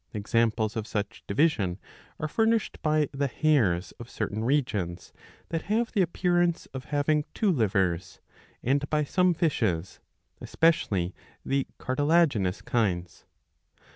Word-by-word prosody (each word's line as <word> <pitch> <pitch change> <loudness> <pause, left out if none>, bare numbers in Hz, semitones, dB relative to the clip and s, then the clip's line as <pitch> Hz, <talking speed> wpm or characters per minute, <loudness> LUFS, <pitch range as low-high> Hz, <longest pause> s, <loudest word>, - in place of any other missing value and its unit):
^ - - -47
Examples 110 +1 +1
of 110 -2 -3
such 105 +1 -4
division 100 - +1 0.4
are 155 - -1
furnished 225 +5 0
by 155 -1 +2
the 140 +1 -1
hares 120 - +1
of 120 0 -9
certain 110 +2 -3
regions 105 -10 -1 0.4
that 165 -1 -2
have 230 +2 +1
the 205 - +2
appearance 175 -1 +1
of 130 0 -6
having 150 0 +1
two 210 -4 +2
livers, 95 - 0 0.4
and 140 +3 +1
by 150 -1 +1
some 180 +4 +2
fishes, 110 - 0 0.4
especially 100 - +1 0.3
the 135 0 0
cartilaginous 135 - +1
kinds. 90 -8 -1
135 Hz, 125 wpm, -27 LUFS, 100-160 Hz, 0.4 s, by